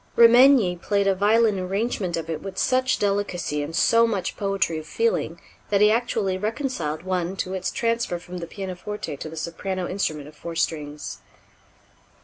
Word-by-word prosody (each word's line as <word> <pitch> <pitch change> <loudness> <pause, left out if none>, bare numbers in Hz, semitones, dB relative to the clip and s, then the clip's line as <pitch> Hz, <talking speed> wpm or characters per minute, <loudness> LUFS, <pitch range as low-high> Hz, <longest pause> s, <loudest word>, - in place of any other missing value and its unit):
Remenyi 235 -6 +6
played 200 +1 +1
a 195 - +4
violin 210 +1 +3
arrangement 190 -1 -1
of 165 -1 -4
it 160 -2 -4
with 195 -1 -7
such 255 0 +2
delicacy 195 -7 -1
and 150 +3 -5
so 230 +6 +4
much 195 -5 -2
poetry 195 -5 0
of 155 - -11
feeling 460 +1 0 0.3
that 200 - +3
he 210 +1 +6
actually 220 -5 0
reconciled 210 - -2
one 185 0 -1
to 185 -1 -3
its 185 -1 -2
transfer 230 -6 -1
from 175 +1 -8
the 170 - -6
pianoforte 190 -3 -5
to 155 - -6
the 160 - -9
soprano 180 +3 -3
instrument 155 -6 -2
of 150 - -14
four 170 +2 -7
strings. 150 -2 -3
190 Hz, 165 wpm, -24 LUFS, 170-215 Hz, 0.3 s, Remenyi